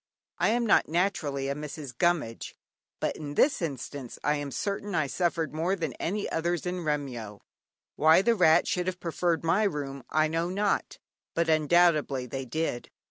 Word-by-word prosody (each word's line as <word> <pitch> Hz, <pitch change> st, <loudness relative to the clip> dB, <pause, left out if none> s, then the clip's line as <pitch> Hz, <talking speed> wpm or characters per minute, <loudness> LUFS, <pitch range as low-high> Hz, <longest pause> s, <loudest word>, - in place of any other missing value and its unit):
I -, -, +3 dB
am 235 Hz, +1 st, +1 dB
not 210 Hz, -, +4 dB
naturally 155 Hz, -6 st, 0 dB
a 140 Hz, -, 0 dB
"Mrs. 150 Hz, -3 st, -7 dB
Gummidge," 155 Hz, -7 st, 0 dB, 0.4 s
but -, -, -1 dB
in 145 Hz, -2 st, -7 dB
this 280 Hz, -, +3 dB
instance 140 Hz, -4 st, -5 dB
I 150 Hz, -, +2 dB
am 145 Hz, -1 st, -4 dB
certain 200 Hz, +5 st, -3 dB
I 155 Hz, -, +2 dB
suffered 165 Hz, +2 st, -1 dB
more 170 Hz, +5 st, 0 dB
than 160 Hz, -8 st, -3 dB
any 200 Hz, +4 st, -2 dB
others 170 Hz, +1 st, -1 dB
in 180 Hz, 0 st, -3 dB
Remyo. 125 Hz, -9 st, -3 dB, 0.6 s
Why 160 Hz, +4 st, +6 dB
the 235 Hz, -, +4 dB
rats 170 Hz, -6 st, +4 dB
should 180 Hz, 0 st, -1 dB
have 185 Hz, -1 st, -2 dB
preferred 170 Hz, 0 st, -1 dB
my 165 Hz, +5 st, +2 dB
room 145 Hz, -9 st, -2 dB
I 155 Hz, 0 st, +3 dB
know 165 Hz, +2 st, -1 dB
not, 200 Hz, +2 st, -1 dB, 0.4 s
but 170 Hz, -1 st, +1 dB
undoubtedly 155 Hz, -4 st, +3 dB
they 135 Hz, +2 st, -5 dB
did. 145 Hz, -2 st, -3 dB
160 Hz, 170 wpm, -28 LUFS, 145-180 Hz, 0.6 s, Why